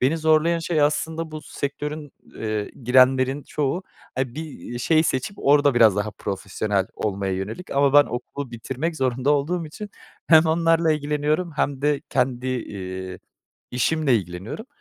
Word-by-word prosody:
beni 135 +6 +2
zorlayan 160 +2 +3
şey 165 -2 0
aslında 160 +2 0
bu 155 0 -7
sektörün, 145 +1 -5 0.2
eee, 110 -2 -3
girenlerin 130 +2 +4
çoğu, 150 +5 -2 0.3
hani, 130 -2 -2
bir 150 -5 -7
şey 155 +6 +3
seçip, 160 +6 -2
orada 145 -1 +4
biraz 110 -4 +5
daha 105 +1 -1
profesyonel 100 -1 -2
olmaya 100 -2 -2
yönelik 95 - -5
ama 140 0 +3
ben 145 0 +8
okulu 130 +2 -5
bitirmek 130 +8 -4
zorunda 130 0 0
olduğum 160 +4 0
için 205 +7 -8 0.4
hem 160 0 +7
onlarla 165 0 +3
ilgileniyorum 150 +3 -1
hem 140 -1 -1
de 145 -1 +2
kendi, 125 0 0
eee, 95 -7 -5 0.5
işimle 135 +1 +2
ilgileniyorum. 95 - -6
140 Hz, 140 wpm, -23 LUFS, 120-155 Hz, 0.5 s, ben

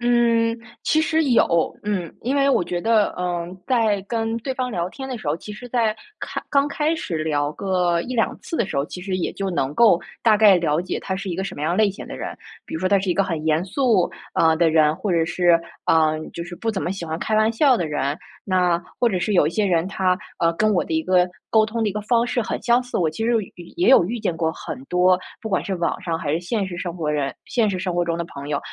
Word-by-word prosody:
嗯， 235 -1 +2 0.3
其 315 - +3
实 320 0 +1
有。 230 -10 +2
嗯。 185 -6 -2
因 260 +5 0
为 280 0 +3
我 260 - +3
觉 175 0 -3
得， 220 -1 +2
嗯， 175 0 -3
在 225 -6 +2
跟 225 +2 -2
对 260 +3 -4
方 255 -1 -2
聊 175 -4 -2
天 265 +4 -7
的 250 -3 -4
时 170 - -10
候， 150 - +1
其 210 - -9
实 245 +4 -9
在 230 -3 +1 0.2
开 - - -4
刚 280 0 +3
开 305 +3 0
始 175 - -3
聊 145 -2 0
个 180 -2 0
1-2 245 0 -1
次 330 - -5
的 - - +2
时 - - -5
候， 140 - +1
其 180 - -8
实 185 -1 -2
也 180 - -2
就 195 -1 -3
能 145 -5 -1
够 220 -7 +5 0.2
大 220 -2 +5
概 205 -3 +7
了 165 -2 +1
解 180 - -4
他 190 -1 -3
是 195 - -5
一 175 - -2
个 190 - -2
什 - - -5
么 145 - -6
样 170 +3 0
类 215 -1 +4
型 195 - -9
的 - - -7
人。 - - -6 0.3
比 - - -8
如 160 - -3
说 185 - +1
他 200 - +4
是 190 -1 -1
一 - - +1
个 195 - +2
很 165 -4 -3
严 160 +2 +2
肃 215 -2 +2 0.3
啊 160 -1 +4
的 165 0 +3
人， 155 -1 +4
或 190 +1 -3
者 165 -1 +3
是， 175 0 +3 0.3
呃， 155 -1 +3 0.2
就 170 - -5
是 175 0 -8
不 225 +5 -2
怎 195 - -3
么 180 - -1
喜 190 -3 -6
欢 160 0 -4
开 215 - -1
玩 215 +1 +3
笑 260 +2 +4
的 175 -6 -1
人。 145 -1 -1 0.3
那 180 -2 +1 0.2
或 240 - +2
者 185 - 0
是 205 +3 -1
有 150 - +5
一 - - 0
些 210 +4 0
人 170 -1 +1
他， 185 -2 +1 0.2
呃， 165 - +3
跟 215 +3 +2
我 180 - +2
的 160 - -3
一 160 - +1
个 180 +1 +3 0.2
沟 220 -1 +4
通 225 +1 -2
的 215 - +2
一 200 - -3
个 210 - -3
方 235 +2 +2
式 245 - 0
很 220 - -3
相 240 +2 +3
似。 250 - -5
我 160 -3 +1
其 225 - -5
实 235 - +2
也有 215 -5 -1
与 175 - -10
也 350 - +3
有 265 - +7
遇 235 +3 -3
见 175 - -1
过 160 -1 0
很 130 -4 -7
多， 180 +1 +3 0.2
不 220 - -4
管 190 - +1
是 195 - -3
网 170 -1 -1
上 165 -2 -2
还 145 -2 -2
是 165 - 0
现 195 +3 -2
实 175 -2 -6
生 175 -1 -4
活 155 -3 -2
人 140 -3 -1
现 230 -5 +1
实 185 - -2
生 180 -1 -2
活 175 - +2
中 170 -1 -1
的 170 - -3
朋 140 -3 -9
友， 145 -1 0
185 Hz, 295 characters per minute, -22 LUFS, 170-225 Hz, 0.3 s, 概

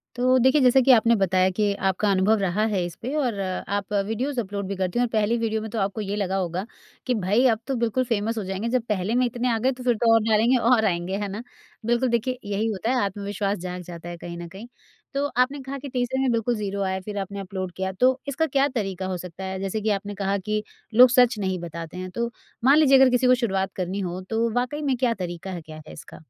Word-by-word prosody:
तो 255 +1 +3
देखिए, 260 +4 +4
जैसा 255 +1 +6
कि 260 - +5
आपने 230 0 +5
बताया 190 -1 +2
कि 205 -1 +2
आपका 195 +2 +1
अनुभव 195 +3 +3
रहा 195 +2 0
है 195 -4 0
इस 175 - -7
पे 255 +5 -4
और 245 -9 0
आप 195 +2 -3
वीडियोज़ 250 +5 -2
अपलोड 200 -1 -5
भी 200 - -3
करती 185 +4 -1
हैं 245 - +3
और - - -5
पहली 220 +1 +1
वीडियो 220 -1 -1
में 220 - -6
तो 225 - -2
आपको 200 +3 -1
ये 205 0 -3
लगा 195 -2 -1
होगा, 185 +1 -2 0.4
कि 250 - +1
भाई 210 +6 +2
अब 225 -2 +2
तो 270 - -1
बिल्कुल 245 +3 +1
फेमस 225 0 -1
हो 210 - -2
जाएँगे, 195 +5 -3
जब 255 -1 +1
पहले 210 +3 0
में 250 0 +3
इतने 245 +1 -1
आ - - +1
गए 260 +3 +2
तो 250 -1 -8
फिर 245 -2 +2
तो 225 +1 +3
और 225 - +6
डालेंगे 225 +3 +3
और 235 -2 +3
आएँगे, 175 +1 -1
है 205 -1 -2
ना? 220 +4 -6 0.4
बिल्कुल 240 +2 +2
देखिए, 245 +2 0
यही 205 +2 -1
होता 220 +2 -2
है, - - +1
आत्मविश्वास 200 +1 -2
जाग 180 0 -6
जाता 170 0 -9
है 175 - -7
कहीं 170 0 -8
न 170 0 -7
कहीं। 195 +7 -10 0.5
तो 280 +1 0
आपने 265 +3 +2
कहा 270 +1 -6
कि 280 0 -7
तीसरे 250 +1 -1
में 260 -2 +2
बिल्कुल 230 +1 0
0 200 -1 -3
आया, 190 0 -1
फिर 205 -1 -5
आपने 200 +1 -4
अपलोड 185 -1 -5
किया 190 0 -2
तो 260 +1 +4
इसका 300 +4 0
क्या 275 -1 +2
तरीका 195 -4 -2
हो 185 -1 -2
सकता 180 +1 -8
है? 190 0 -4
जैसे 195 +2 -3
कि 215 - 0
आपने 205 0 -2
कहा 195 0 -1
कि 210 +2 -2 0.3
लोग 250 +2 +8
सच 245 -2 +4
नहीं 190 -2 -1
बताते 170 0 -7
हैं। 185 0 -5
तो 235 0 -1 0.4
मान 280 +3 +7
लीजिए 275 -3 +6
अगर 265 -1 +6
किसी 250 0 +2
को 255 - +6
शुरुआत 195 -5 -1
करनी 185 +2 -3
हो, 180 -1 -4
तो 225 +4 -1
वाक़ई 265 +5 -1
में 275 -3 +1
क्या 240 -2 +2
तरीका 180 -1 -6
है, 175 -2 -5
क्या 155 0 -11
है - - -10
इसका? - - -12
215 Hz, 255 wpm, -24 LUFS, 190-245 Hz, 0.5 s, लोग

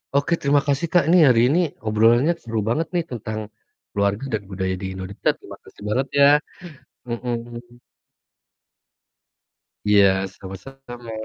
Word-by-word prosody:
Oke 140 +4 +2
terima 140 0 +3
kasih, 145 +4 0
Kak, 175 - +5
ini 180 - +6
hari 120 -3 +5
ini 165 - +3 0.3
obrolannya 115 +8 +3
seru 115 -1 -3
banget 155 +7 0
nih 170 -2 0
tentang 110 -2 -5 0.5
keluarga 100 +3 0 0.2
dan - - -18
budaya 95 0 -2
di - - -4
Indonesia, 95 +1 -3
terimakasih - - -14
banget 130 +5 0
ya! 140 0 +8 0.8
Mhm. 120 0 -6 2.1
Iya, 95 -2 +4
sama-sama. 120 +5 -10
120 Hz, 125 wpm, -22 LUFS, 100-135 Hz, 2.1 s, ya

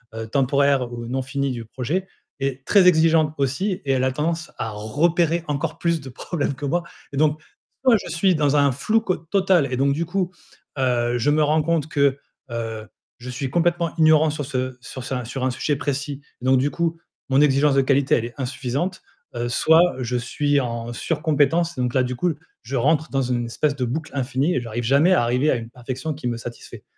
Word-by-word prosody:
heu, 115 0 -5
temporaires 135 0 +2
ou 120 -1 -6
non 130 +3 -2
finis 140 0 -2
du 120 -2 -5
projet 140 - -3 0.3
est 135 -1 -3
très 195 -3 +5
exigeante 160 -2 +4
aussi, 140 +9 0
et 135 - +1
elle 130 0 +1
a 130 - +2
tendance 165 +5 -2
à 110 - -3
repérer 165 +10 +1
encore 155 +2 -2
plus 170 -2 0
de 130 - -9
problèmes 145 +3 -3
que 145 - -6
moi, 175 +5 0 0.3
et 140 - -4
donc, 155 0 +2
si - - -25 0.4
moi, 245 -3 +7
je - - -8
suis 175 +2 +2
dans 145 -1 +2
un 140 -1 +4
flou 215 - +1
co 185 -5 -1
total 175 -4 +1
et 125 - -1
donc, 140 +1 +2
du 165 +3 -1
coup, 180 0 -1 0.5
heu, 120 -2 +1
je 140 +5 +2
me 155 +1 +3
rends 155 +1 +3
compte 160 -1 0
que, 140 -2 +2 0.3
heu, 115 -2 -4 0.3
je 125 +1 -8
suis 130 +1 -3
complètement 170 +1 +1
ignorant 155 -1 +5
sur 145 -1 -4
ce 130 -2 -3
sur 130 +1 -8
sa 125 -1 -3
sur 125 +2 -4
un 130 - +1
sujet 145 +3 -1
précis, 145 0 -3 0.2
donc, 130 +1 +3
du 145 +2 +1
coup, 165 -1 -1 0.3
mon 135 +1 +3
exigence 145 0 +4
de 135 - +5
qualité, 135 0 +3
elle 115 - -1
est 120 - -8
insuffisante. 130 +7 -3 0.3
Heu, 120 0 -2
soit, 165 +7 +4
heu, 130 - -3
je 125 +1 -1
suis 145 +4 0
en 115 -2 -3
sur-compétence, 155 +6 +1
donc 125 -1 -1
là, 130 - +3
du 125 0 -3
coup, 175 +1 +1 0.3
je 130 +4 -5
rentre 150 +3 +2
dans 135 -1 +1
une 120 -1 -1
espèce 140 +5 -1
de 125 - 0
boucle 150 +6 -4
infinie 135 +4 0
et - - +2
j'arrive 120 0 -4
jamais 140 +9 +4
à 180 - +4
arriver 125 +5 +2
à - - +2
une 115 -1 -6
perfection 130 +5 -5
qui 145 -4 -5
me 120 - -1
satisfait. 120 0 -9
140 Hz, 215 wpm, -22 LUFS, 125-160 Hz, 0.5 s, moi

